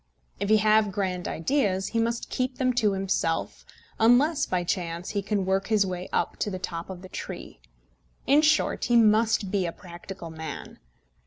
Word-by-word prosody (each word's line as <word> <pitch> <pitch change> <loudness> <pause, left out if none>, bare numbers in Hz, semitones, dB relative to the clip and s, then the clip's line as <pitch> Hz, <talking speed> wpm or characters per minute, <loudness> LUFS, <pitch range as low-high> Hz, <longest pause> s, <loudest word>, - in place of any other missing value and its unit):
If 200 - -2
he 215 - +6
have 215 0 +3
grand 185 -2 -2
ideas, 195 - 0
he 230 - -1
must 230 +1 -1
keep 255 0 -2
them 255 -1 +1
to 220 -4 +2
himself, 190 -4 -1 0.4
unless 275 +7 +4
by 180 -1 0
chance 175 -1 -3
he 205 - -1
can 200 -1 -1
work 190 +1 0
his 215 -2 +3
way 180 -1 -5
up - - -1
to - - -1
the 185 - -4
top 170 -1 -5
of 185 -1 -8
the - - -8
tree. - - -7 0.7
In 285 +3 +5
short, 305 0 +2
he 240 - +2
must 220 -3 +4
be 195 -3 +1
a - - -3
practical 175 0 -10
man. 160 0 -8
200 Hz, 180 wpm, -26 LUFS, 185-230 Hz, 0.7 s, he